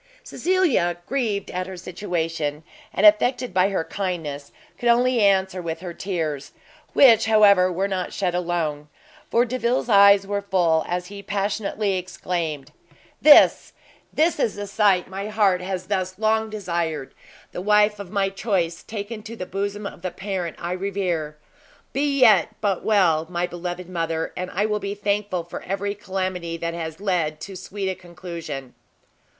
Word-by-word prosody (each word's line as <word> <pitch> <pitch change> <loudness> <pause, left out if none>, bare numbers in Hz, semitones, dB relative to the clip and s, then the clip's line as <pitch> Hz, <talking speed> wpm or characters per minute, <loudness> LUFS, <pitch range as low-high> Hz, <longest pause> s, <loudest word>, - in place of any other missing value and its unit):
Cecilia, 340 - +1
grieved 225 -8 -2
at 185 0 -3
her 190 -1 -7
situation, 165 -5 -3 0.3
and 205 - +1
affected 245 +3 +4
by 185 +1 +3
her 190 -4 -1
kindness, 160 -8 -4 0.3
could 240 - +1
only 245 +1 +3
answer 190 -2 +2
with 165 -1 -5
her 180 -2 -6
tears; 160 -7 -4 0.4
which, 230 -5 +6
however, 200 -4 +5
were 190 +3 -1
not 185 -2 -3
shed 185 -3 -1
alone; 165 -4 -2 0.4
for 240 +1 +3
Delvile's 245 0 -1
eyes 200 -1 +7
were 200 0 -2
full, 175 -5 +2
as 180 +1 -2
he 200 +2 -9
passionately 200 0 -1
exclaimed, 165 -5 -4 0.5
"This, 300 -1 +6 0.4
this 315 0 +1
is 230 - +1
the 205 0 -5
sight 200 -2 +2
my 195 +2 -5
heart 205 -4 +2
has 185 0 -4
thus 185 -2 -2
long 220 +1 +1
desired! 170 -8 -3 0.4
the - - -5
wife 210 +1 +3
of 200 -3 -7
my 195 -1 0
choice 195 -4 -1
taken 215 +1 -6
to 225 +2 -8
the 185 - -5
bosom 200 +2 -4
of - - -7
the 185 - -2
parent 180 -2 -4
I 175 0 -4
revere! 180 -5 -2 0.6
be 280 +1 0
yet 210 -9 +6
but 195 -3 -1
well, 170 -7 +3
my 175 0 -1
beloved 175 0 -6
mother, 165 -2 -2
and 180 0 -4
I 200 +4 0
will 210 -1 0
be 200 0 -4
thankful 205 -3 -1
for 170 - -8
every 200 +2 -3
calamity 185 -4 -4
that 170 0 -3
has 160 -1 -5
led 170 -6 -1
to 195 - -7
so 185 - -9
sweet 200 -1 -3
a 190 - 0
conclusion!" 170 -7 -8
190 Hz, 160 wpm, -23 LUFS, 175-205 Hz, 0.6 s, eyes